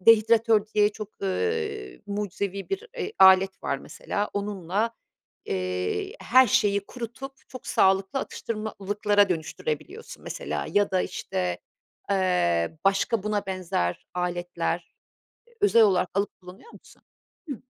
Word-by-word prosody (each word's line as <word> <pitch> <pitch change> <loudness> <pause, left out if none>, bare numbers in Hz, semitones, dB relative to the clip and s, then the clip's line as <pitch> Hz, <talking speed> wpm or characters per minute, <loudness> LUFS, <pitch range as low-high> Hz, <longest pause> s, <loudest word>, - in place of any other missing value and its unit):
dehidratör 225 0 +5
diye 210 -1 +5
çok, 215 -1 -7
eee, 425 - -2
mucizevi 200 -1 -3
bir, 395 +4 -3
eee, 425 -2 -3
alet 190 0 +6
var 135 - -1
mesela. 205 +8 -4
Onunla, 205 +1 -1 0.5
eee, 90 - -2
her 260 0 +6
şeyi 205 -4 +2
kurutup, 250 +3 -7 0.2
çok 255 - -10
sağlıklı 195 +6 +3
atıştırmalıklara 205 -3 0
dönüştürebiliyorsun, 180 - -4
mesela. - - -4
Ya 205 0 +2
da, 185 -1 +2
işte, 90 -1 -3 0.5
eee, 160 - +1
başka 195 +2 +2
buna 210 -1 -1
benzer 180 - -2
aletler, 175 -1 -2 0.5
eee, 475 - -25
özel 390 - +6
olarak 185 -3 +3
alıp 200 0 -1
kullanıyor 185 - -13
musun? - - -17 0.5
Hıh. 275 - -2
200 Hz, 120 wpm, -26 LUFS, 185-230 Hz, 0.5 s, alet